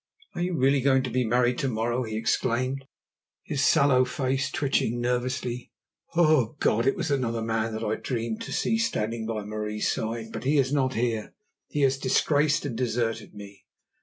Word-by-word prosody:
Are - - -4
you 180 0 0
really 135 +1 +3
going 135 0 +3
to 130 - -4
be 125 +2 +1
married 120 +1 +2
to 135 - 0
morrow?" 120 +1 -1
he 110 -3 -4
exclaimed, 130 +4 0 0.6
his 140 - -1
sallow 140 -3 +5
face 130 +1 -1
twitching 125 -4 0
nervously. 125 0 -2 0.4
"O 155 -8 +3
God, 115 +4 +2
it 135 - +3
was 170 -4 -2
another 115 -4 0
man 110 0 -1
that 110 +1 -4
I 110 0 -1
dreamed 115 -3 -3
to - - -6
see 225 - +1
standing 115 - -1
by 110 -2 -3
Marie's 105 0 -2
side. 110 0 -3
But - - -5
he 145 +3 +2
is 135 0 +2
not 130 -2 +1
here; 115 -2 -1 0.3
he 145 - -2
has 135 -1 +3
disgraced 145 +3 +2
and 130 -5 -3
deserted 115 -2 -2
me. 100 -1 -12
125 Hz, 180 wpm, -26 LUFS, 115-135 Hz, 0.6 s, sallow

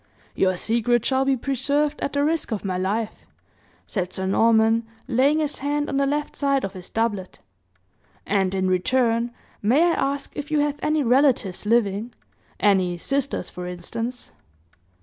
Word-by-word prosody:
"Your 185 -1 +1
secret 235 +3 +1
shall 265 0 +2
be 270 -1 +2
preserved 285 +4 0
at 280 - -2
the 285 0 +1
risk 320 -3 -1
of 210 -2 -3
my 185 -1 -1
life," 205 +4 -1 0.7
said 185 -3 -3
Sir 190 - -4
Norman, 225 +3 +3 0.2
laying 270 +4 +3
his 300 -2 -1
hand 290 +1 -1
on 275 - -1
the 275 0 +2
left 295 +1 -2
side 275 -2 +1
of 195 - -3
his 185 -1 -8
doublet; 210 -5 -2 0.9
"and 195 -2 +1
in 190 0 +1
return, 235 +5 +1 0.3
may 250 +10 +4
I 350 - +4
ask 280 +1 -2
if 290 +1 -5
you 305 -1 +2
have 290 0 -1
any 305 -1 +1
relatives 245 -7 +2
living 225 0 +1 0.4
any 185 -4 +2
sisters 275 -1 -2
for 180 0 -6
instance?" 230 +8 -5
235 Hz, 160 wpm, -23 LUFS, 195-280 Hz, 0.9 s, may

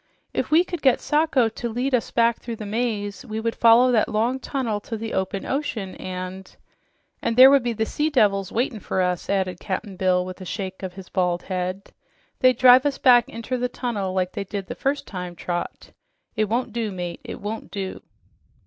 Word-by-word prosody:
"If - - -1
we 320 +3 +5
could 350 -3 -6
get 265 -3 +4
Sacho 295 -5 +2
to 235 +2 -5
lead 250 +4 -2
us 245 - +1
back 235 0 +2
through 235 -1 -6
the 215 - -7
maze, 205 -2 -2
we 220 -3 -5
would 230 +1 -1
follow 235 +2 +6
that 225 -3 +2
long 230 +4 0
tunnel 250 -7 -2
to 225 +2 -6
the 225 +1 -5
open 190 +1 -2
ocean, 230 -9 -3
and 185 +1 -7 0.3
" - - -45
"And 230 0 -1
there 260 +2 +10
would 280 -1 +5
be 240 -1 -1
the 220 0 -1
sea 300 +7 -1
devils 200 -9 +2
waitin' 240 -1 -1
for 185 -1 -1
us," 180 -1 -2
added 185 -3 0
Cap'n 195 0 -4
Bill 180 -1 +2
with 185 +1 -8
a - - -5
shake 190 0 -5
of 185 -2 -5
his 190 0 -11
bald 180 -2 0
head. 185 +1 -4 0.5
"They'd 255 -2 +4
drive 250 +1 +7
us 280 - -2
back 245 -2 +5
inter 230 +3 -4
the 250 0 -1
tunnel 210 -8 -3
like 185 -1 -1
they - - -4
did 200 0 -5
the - - -6
first 280 +1 -2
time, 180 -2 -6
Trot. 175 0 -5 0.4
It 215 -1 +2
won't 235 0 -1
do, 230 -3 -2
mate, 175 -2 -5
it - - -7
won't 215 +2 -5
do." 195 -2 -5
220 Hz, 210 wpm, -23 LUFS, 190-245 Hz, 0.5 s, there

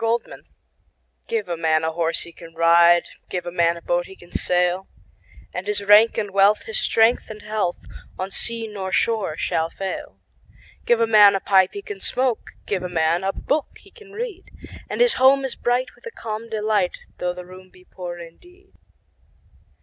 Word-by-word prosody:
Gifts 230 +1 -2 0.8
GIVE 460 -2 -2
a 170 - -2
man 160 -1 +1
a 160 - 0
horse 165 0 0
he 170 - -8
can 165 0 -14
ride, 170 +1 +5 0.2
Give 180 -1 -4
a 175 - -4
man 170 -1 +2
a 170 - -12
boat 175 0 0
he 190 - -12
can 175 -1 -18
sail; 180 +1 0 0.7
And 180 +2 -5
his 210 -1 -1
rank 210 +3 +6
and 205 -2 -2
wealth, 200 +2 +4
his 470 +1 -1
strength 230 - +2
and 215 -1 -9
health, 210 -4 -2 0.4
On 190 +1 -4
sea 230 +2 +1
nor 195 -3 -6
shore 210 -9 0
shall 160 0 -1
fail. 195 +2 -6 0.7
Give 240 -1 +4
a 230 - +4
man 210 -3 +7
a - - 0
pipe 190 -1 +3
he 405 - -7
can 415 -2 -8
smoke, 255 - -1
5 - - -34
Give 195 -3 -2
a 180 - -4
man 165 +1 +1
a 195 - 0
book 290 +8 -2
he - - -20
can 425 -4 -16
read: 420 -3 -6 0.4
And - - -2
his 485 -1 +5
home 270 +1 +5
is 265 - -3
bright 245 +1 -1
with - - -13
a - - -7
calm 225 - -6
delight, 210 -4 -1 0.2
Though 180 0 -2
the 180 0 -8
room 185 +1 -14
be 185 0 -20
poor 175 -2 -8
indeed. 355 - -15
195 Hz, 195 wpm, -22 LUFS, 175-230 Hz, 0.8 s, man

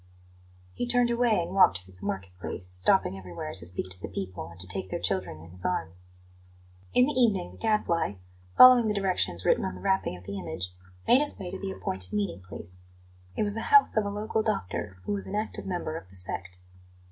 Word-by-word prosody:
He 245 - -3
turned 245 0 +3
away 235 -3 +3
and 175 +2 -6
walked 90 - +5
through 95 - -17
the 90 - -16
market 95 -1 -4
place, 90 +1 -4
stopping 90 +1 +3
everywhere 85 -4 -7
to 90 -3 -2
speak 90 +1 -3
to 90 -1 -3
the - - -4
people, 95 -1 -5
and 85 +1 -14
to 90 - 0
take 95 +1 -4
their - - -3
children 80 - -2
in 85 - -13
his 90 +1 -4
arms. 90 +1 -3 0.8
In 250 - +5
the 295 - -1
evening 215 -9 +2
the - - -15
Gadfly, 210 - +1 0.4
following 250 -3 +9
the 210 - 0
directions 185 - +1
written - - +3
on 190 - -3
the - - -10
wrapping 190 - 0
of 90 - -14
the 100 +2 -5
image, 90 0 -5 0.3
made 250 - +7
his 295 0 +1
way 180 -2 -6
to 190 - -6
the 195 - -4
appointed 95 - -2
meeting 100 -2 -1
place. 90 0 -7 0.5
It - - +1
was 205 -1 -1
the 225 - -3
house 425 -1 +6
of 220 - +3
a 200 - -2
local 215 +2 -1
doctor, 105 - -3
who - - -4
was 200 -1 -2
an 200 - -4
active 215 -1 -3
member 175 -4 -3
of 95 - -8
the 95 - -17
"sect." 95 0 -5
105 Hz, 220 wpm, -28 LUFS, -, 0.8 s, following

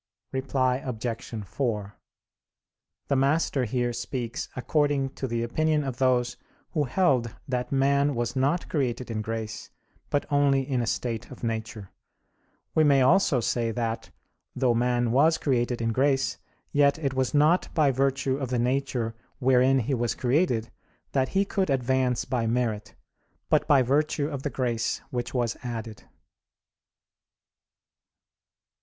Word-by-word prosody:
Reply 130 -1 0
Obj. 115 -3 -5
4: 105 -2 -3 1.1
The 140 - +1
Master 135 -1 +2
here 120 +1 -1
speaks 120 0 -4
according 145 0 +1
to 135 - -5
the 115 -1 -1
opinion 155 +5 +1
of 130 -3 -4
those 125 -2 +1 0.3
who 150 -4 0
held 130 - +1
that 125 +1 -2
man 140 +1 +2
was 120 +1 -2
not 140 +6 +1
created 125 -4 -2
in 110 -1 -2
grace, 110 0 -5 0.4
but 145 - 0
only 140 -2 +3
in 130 -3 0
a 115 - -2
state 115 -2 -2
of - - -12
nature. 110 -3 -4 0.8
We 155 - +4
may 140 -3 +5
also 150 -3 +4
say 115 0 0
that, 115 0 -3 0.5
though 125 -2 +2
man 120 0 +1
was 155 +6 +4
created 120 -4 0
in 115 - +1
grace, 135 +3 +1 0.3
yet 145 0 +4
it 140 -4 -2
was 130 +1 0
not 155 +5 +3
by 150 -4 +4
virtue 135 0 0
of 135 -3 -4
the 125 - 0
nature 125 -2 0 0.2
wherein 130 +1 +4
he 135 +5 -2
was 120 -2 0
created 125 -3 +1 0.4
that 130 -1 +1
he 195 +1 +1
could 195 -3 -1
advance 130 -1 +1
by 120 -3 -1
merit, 110 -3 -1 0.6
but - - +3
by 140 -3 +5
virtue 145 +3 +1
of 140 -3 -5
the 145 - -2
grace 120 -4 -1
which 120 +1 -3
was 120 -2 0
added. 115 -4 -6
130 Hz, 140 wpm, -26 LUFS, 120-140 Hz, 1.1 s, may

